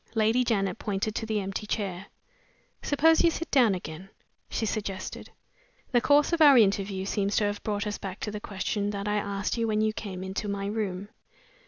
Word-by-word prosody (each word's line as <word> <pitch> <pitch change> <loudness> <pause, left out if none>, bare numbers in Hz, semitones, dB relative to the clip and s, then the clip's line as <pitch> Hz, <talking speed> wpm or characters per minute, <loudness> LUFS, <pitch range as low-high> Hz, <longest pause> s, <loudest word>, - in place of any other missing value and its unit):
Lady 225 +3 +3
Janet 195 -6 0
pointed 205 +1 -2
to 225 - -3
the 215 -1 0
empty 195 +2 -4
chair. 195 -3 -3 0.7
"Suppose 320 +3 +4
you 340 - +6
sit 330 0 -5
down 240 -8 +5
again?" 175 +1 -8 0.4
she 225 - -1
suggested. 200 -3 -4 0.6
"The 240 -3 +4
course 290 +5 +4
of 335 - +1
our 285 -4 +8
interview 195 -3 +2
seems 200 0 -1
to - - +3
have 205 0 -1
brought 205 0 -2
us 210 -1 -3
back 190 -1 -6
to 210 - -3
the 210 - -5
question 205 0 -2
that 200 0 -4
I 210 0 +1
asked 200 +2 -2
you 230 - +1
when 215 -1 +1
you 215 0 +1
came 190 -4 -6
into 190 +2 -4
my 200 -1 -3
room. 205 -2 -3
205 Hz, 195 wpm, -27 LUFS, 195-225 Hz, 0.7 s, our